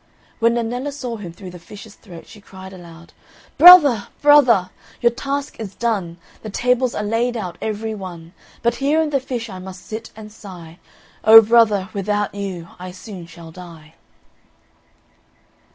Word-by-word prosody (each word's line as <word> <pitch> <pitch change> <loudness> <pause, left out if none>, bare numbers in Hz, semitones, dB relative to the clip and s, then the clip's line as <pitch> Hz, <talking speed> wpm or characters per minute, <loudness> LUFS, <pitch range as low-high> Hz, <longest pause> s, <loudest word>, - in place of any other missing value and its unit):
When 230 +1 +2
Nennella 245 +4 -3
saw 250 -5 -6
him 190 -5 -9
through 185 +2 -11
the 180 - -12
fish's 205 +4 -13
throat, 175 -7 -14
she 210 - -16
cried 190 -1 -13
aloud, 170 -2 -14 0.5
"Brother, 295 - +8
brother, 255 -11 +4 0.3
your 235 - +2
task 280 +3 -5
is 200 -4 -8
done, 200 -8 -3 0.2
The 215 - -8
tables 250 +3 0
are - - -3
laid 230 +3 -1
out 180 -6 -6
every 220 +1 -4
one; 175 -4 -10 0.3
But 235 0 0
here 290 +3 +1
in 315 -2 -1
the 275 - +1
fish 245 -3 -6
I 190 -4 -9
must 185 0 -11
sit 225 +1 -8
and 215 -1 -12
sigh, 180 -6 -13 0.4
O 220 +1 +10
brother, 215 -3 +2
without 205 0 -2
you 190 -4 -6
I 185 +1 -8
soon 185 -1 -11
shall 170 -1 -13
die." 165 -3 -14
210 Hz, 160 wpm, -19 LUFS, 185-235 Hz, 0.5 s, O